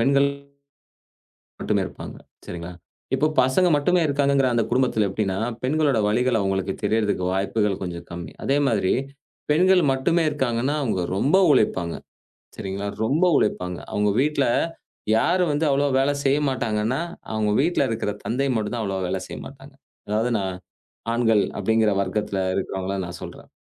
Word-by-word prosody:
பெண்கள் 140 +3 +4 1.3
மட்டுமே - - 0
இருப்பாங்க. - - -9 0.3
சரிங்களா! 85 +1 -7 0.4
இப்போ 150 +4 +2
பசங்க 130 +8 +3
மட்டுமே 175 +5 +2
இருக்காங்கங்கிற 140 -2 +2
அந்த 115 - +2
குடும்பத்துல 120 -4 +2
எப்படின்னா? 95 -1 -2 0.3
பெண்களோட 145 -1 +2
வலிகள் 120 +2 +2
அவுங்களுக்கு 95 -1 -1
தெரியறதுக்கு 105 -4 +1
வாய்ப்புகள் 100 +1 0
கொஞ்சம் 85 -2 -5
கம்மி. 85 -2 -7
அதே 140 - +2
மாதிரி 100 -6 +1 0.6
பெண்கள் 180 +4 +4
மட்டுமே 165 +6 +1
இருக்காங்கன்னா 130 -1 -1
அவுங்க 110 -8 -1
ரொம்ப 145 - +3
உழைப்பாங்க. 90 - +1 0.6
சரிங்களா? 100 +1 -4 0.2
ரொம்ப 150 +10 +2
உழைப்பாங்க. 90 -1 -1
அவுங்க 105 0 +1
வீட்ல 145 0 +1 0.7
யாரு 180 +10 +2
வந்து 150 +2 0
அவ்வளவா 140 +1 +2
வேலை 140 +2 +2
செய்யமாட்டாங்கன்னா, 130 -4 0 0.3
அவுங்க 110 -1 0
வீட்ல 170 +2 +2
இருக்கிற 115 -2 -2
தந்தை 135 +4 0
மட்டும்தான் 110 +1 -2
அவ்வளவா 95 -2 -2
வேலை 95 0 -2
செய்யமாட்டாங்க. 135 0 -10 0.3
அதாவது 110 +4 0
நான் 95 -2 -3 0.6
ஆண்கள் 115 -3 +3 0.2
அப்படிங்கிற 110 -1 +2
வர்க்கத்துல 100 +1 -2 0.2
இருக்கிறவங்கள 95 0 -3
நான் 85 - -7
சொல்றேன். - - -10
115 Hz, 130 wpm, -23 LUFS, 100-140 Hz, 1.3 s, பெண்கள்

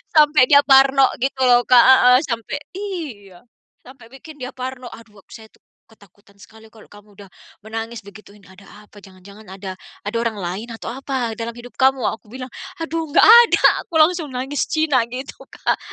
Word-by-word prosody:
Sampai 300 -3 +5
dia 285 +2 +5
parno 270 -1 +4 0.2
gitu 270 0 -3
loh 245 0 +4
Kak 245 -1 +5
heeh, 250 -1 +6
sampai 230 +1 -4 0.2
iya, 295 - -8 0.4
sampai 255 -3 -17
bikin 295 +4 -14
dia 255 -1 -7
parno, 255 -1 -8
"Aduh 210 -3 -16
ak - - -29
saya 220 -1 -13
tuh - - -31 0.2
ketakutan 200 -2 -24
sekali 220 +2 -17
kalau 220 0 -19
kamu 205 0 -18
udah 200 -1 -15 0.3
menangis," 225 +1 -7
digituin. 200 0 -16
"Ada 190 +2 -18 0.2
apa? 205 - -17
Jangan-jangan 200 +2 -17
ada, 190 +1 -8 0.3
ada 205 +3 -4
orang 230 -1 -2
lain 195 +3 -6
atau 225 - -8
apa 260 -2 -4
dalam 230 0 -6
hidup 240 +1 -13
kamu?" 265 -1 +2
aku 220 - -12
bilang, 255 +3 -10 0.3
"Aduh 325 +1 -4
enggak 290 - +3
ada!" 470 +2 +6 0.2
aku 425 - -26
langsung 320 +1 +2
nangis 270 +3 -3
Cina 310 -4 +1
gitu 255 +3 -9
Kak. - - -3
240 Hz, 175 wpm, -19 LUFS, 210-270 Hz, 0.4 s, heeh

